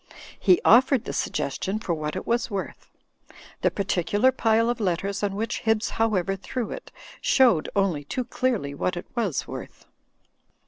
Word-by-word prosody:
He 185 -3 +5
offered 255 +2 +6
the - - -4
suggestion 195 +2 -2
for 210 -5 -2
what 155 -1 -3
it - - -4
was 235 +2 0
worth. 200 -3 -5 0.7
The - - +3
particular 200 +5 +1
pile 225 -1 +2
of 240 0 -1
letters 195 0 -1
on 200 -1 -1
which 225 +3 -2
Hibbs 220 -1 0
However 195 -4 +1
threw 225 +4 -4
it, - - -8 0.3
showed 245 - +4
only 190 -7 +1
too 255 - -2
clearly 230 - -1
what 180 +5 -2
it 175 - -6
was 210 - -1
worth. - - -9
205 Hz, 155 wpm, -25 LUFS, 180-230 Hz, 0.7 s, offered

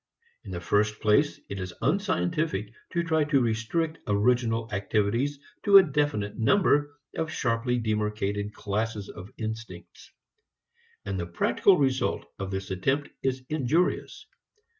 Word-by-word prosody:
In 105 - -10
the 90 -2 -4
first 105 +5 +1
place, 140 +8 +3
it 100 - -5
is 90 -1 -6
unscientific 155 - 0 0.2
to 170 - -1
try 160 -2 +2
to 145 -2 +3
restrict 125 +8 -1
original 115 +2 +2
activities 110 +8 0 0.2
to 200 -1 +8
a 195 - +9
definite 145 - -1
number 145 - +3 0.2
of 160 -1 -2
sharply 125 -3 0
demarcated 105 -2 -1
classes 105 0 -3
of 95 +3 -9
instincts. 110 -5 -7 1.0
And 100 -1 -3
the 85 - -3
practical 135 - +3
result 130 -3 0
of 95 -1 -3
this 95 0 -4
attempt 135 +10 0
is 130 -1 -1
injurious. 155 +3 0
115 Hz, 130 wpm, -27 LUFS, 105-145 Hz, 1.0 s, a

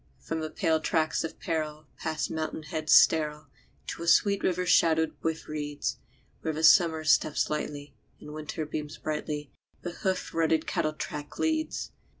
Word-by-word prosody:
From 165 - -4
the 155 0 -3
pale 160 0 +1
tracts 155 -1 0
of 160 - -6
peril, 155 -2 -3
past 160 -1 -2
mountain 155 0 -3
heads 155 0 -3
sterile, 155 -1 +5 0.4
To - - -5
a 170 - -4
sweet 200 +3 +4
river 180 0 +1
shadowed 160 -2 +3
with 160 0 -2
reeds, 145 -1 -3 0.4
Where 160 0 -2
Summer 160 -2 +6
steps 155 -1 +2
lightly, 145 -1 -4 0.3
and 150 - -10
Winter 155 +1 -4
beams 150 0 -5
brightly, 150 -1 -4 0.3
The 175 - -3
hoof 185 +1 -2
rutted 160 -1 +2
cattle 155 -1 -1
track 150 -1 -6
leads. 315 0 -1
155 Hz, 150 wpm, -28 LUFS, 150-165 Hz, 0.4 s, Summer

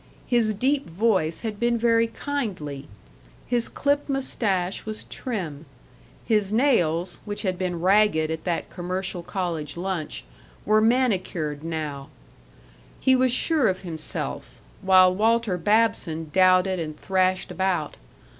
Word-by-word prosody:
His 230 -4 +2
deep 270 +4 0
voice 180 -3 +1
had 215 -3 -4
been 235 0 +2
very 230 0 +3
kindly; 190 - -4 0.6
his 240 -1 0
clipped 285 +1 0
mustache 200 -9 -1
was 215 0 -6
trim; 165 - -5 0.6
his 210 -3 +1
nails, 180 - +1
which 205 +1 -5
had 185 -2 0
been 180 -2 -3
ragged 185 -4 +3
at 160 0 -4
that 175 -2 -2
commercial 180 +1 -3
college 170 -4 -4
lunch, 175 -3 -3 0.4
were 215 +1 +4
manicured 185 - 0
now; 155 -4 -4 0.9
he 260 - +4
was 255 -1 +3
sure 285 +1 +2
of 185 -1 -1
himself, 160 -4 -6 0.2
while 185 -1 +6
Walter 225 0 +2
Babson 185 -6 +1
doubted 185 0 +4
and 155 -2 -5
thrashed 185 -1 0
about. 185 -5 -1
190 Hz, 125 wpm, -24 LUFS, 170-230 Hz, 0.9 s, while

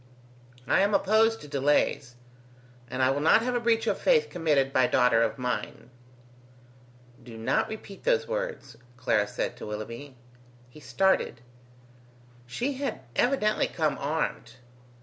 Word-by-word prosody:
I - - +2
am 200 +1 +3
opposed 220 +3 +3
to 150 - -10
delays, 140 -2 0 0.7
and 130 +2 -1
I 130 - +4
will 140 - -1
not 165 +8 +5
have 250 +1 -1
a 245 - +1
breach 230 -1 +1
of - - 0
faith 475 -2 +2
committed 150 -6 +1
by 130 -1 +4
daughter 125 -3 +3
of 115 +2 0
mine." 125 0 -4 1.3
"Do 115 -2 -11
not 115 - 0
repeat 215 -2 -9
those 480 -1 +1
words," - - -5 0.2
Clara 115 -5 +1
said - - -3
to - - -8
Willoughby. 115 +6 -7 0.6
He 150 - -14
started. 190 -7 0 1.1
She 245 - -2
had 275 - -3
evidently 245 -5 +2
come 155 -3 -1
armed. 140 -6 -3
145 Hz, 140 wpm, -27 LUFS, -, 1.3 s, not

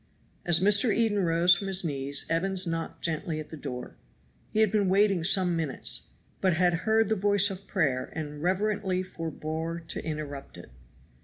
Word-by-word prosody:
As 170 -2 +4
Mr. 205 +4 +4
Eden 215 -1 +1
rose 175 0 +4
from 195 +3 -4
his 190 -1 +3
knees 140 -2 -1
Evans 190 +3 0
knocked 165 -1 -4
gently 160 -1 -2
at 155 - -8
the - - -8
door. 135 -4 -7 0.5
He 215 - 0
had 215 -3 +3
been 205 -3 +2
waiting 195 -2 +3
some 180 -1 +2
minutes, 155 -5 -3 0.3
but 185 -2 +3
had 175 +1 +3 0.2
heard 220 0 +4
the 220 - +1
voice 205 0 +3
of 195 +1 -9
prayer 140 -9 0
and 150 -2 -5
reverently 190 +1 0
forbore 165 -1 -4
to - - -4
interrupt 150 -3 -6
it. - - -12
175 Hz, 170 wpm, -28 LUFS, 160-195 Hz, 0.5 s, As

